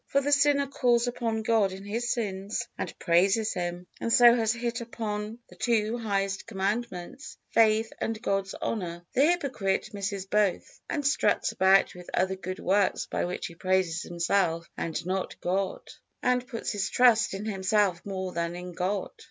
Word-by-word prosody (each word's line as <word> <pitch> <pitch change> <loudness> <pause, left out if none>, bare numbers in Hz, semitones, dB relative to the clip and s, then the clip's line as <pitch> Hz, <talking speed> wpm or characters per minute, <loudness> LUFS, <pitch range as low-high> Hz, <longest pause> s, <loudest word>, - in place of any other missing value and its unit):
For 280 - +2
the 285 +1 -1
sinner 280 0 +4
calls 245 -3 +2
upon 230 -2 -2
God 215 -3 +3
in 190 +1 -8
his 235 +4 -2
sins, 205 0 -2
and - - -5
praises 195 +6 +2
Him, 175 0 -4
and 230 - -2
so 240 0 +8
has 225 -2 +2
hit 235 0 -2
upon 215 -2 -4
the - - -16
two 225 -2 +1
highest 195 -3 -1
Commandments, 205 +2 -3
faith 220 0 +3
and 225 -1 -2
God's 195 -3 -1
honor. 175 -5 -4
The 275 +4 +4
hypocrite 265 - 0
misses 200 -1 -3
both 200 -1 0
and 290 -2 -2
struts 280 +3 +2
about 190 +1 +4
with 180 0 -11
other 190 +1 +1
good 185 0 -6
works 195 +1 +1
by - - -2
which 180 - -4
he 170 - -6
praises 185 -1 0
himself 170 -1 0
and 165 0 -3
not 185 +1 -3
God, 190 +2 -2 0.4
and 250 0 +1
puts 235 -3 -4
his 200 -2 -1
trust 235 -5 +4
in 200 +2 -5
himself 195 -2 +1
more 190 -2 -4
than 170 0 -2
in 180 0 -7
God. 185 +3 -2
200 Hz, 170 wpm, -28 LUFS, 185-230 Hz, 0.4 s, so